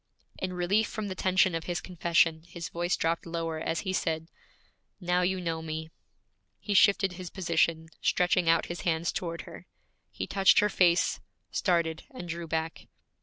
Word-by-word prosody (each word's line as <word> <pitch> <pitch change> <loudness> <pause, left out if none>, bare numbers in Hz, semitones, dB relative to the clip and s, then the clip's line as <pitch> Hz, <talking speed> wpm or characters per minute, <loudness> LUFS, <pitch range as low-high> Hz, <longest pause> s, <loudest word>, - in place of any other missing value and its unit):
In 185 -1 -3
relief 190 +5 +1
from 215 -3 -4
the - - -3
tension 185 0 +2
of 165 0 -3
his 175 -1 -2
confession, 170 -3 +1
his 170 -1 -7
voice 175 +1 -1
dropped 165 +1 -1
lower 165 -1 -3
as 165 +1 -2
he 190 -2 -3
said, 160 -2 -1 0.7
'Now 180 -1 +1
you 185 +1 +1
know 165 -2 -2
me!' 160 0 -5 0.7
He 205 - -3
shifted 200 0 +5
his 180 -1 -7
position, 165 -2 0
stretching 180 -1 +2
out 165 0 +4
his 175 - -6
hands 165 -1 0
toward 170 -2 -4
her. - - -12 0.4
He - - -5
touched 195 -1 +4
her 210 - +5
face, 175 -3 +3 0.3
started, 170 -4 0
and 255 - -8
drew 170 0 -5
back. 160 0 -3
175 Hz, 170 wpm, -29 LUFS, 165-185 Hz, 0.7 s, shifted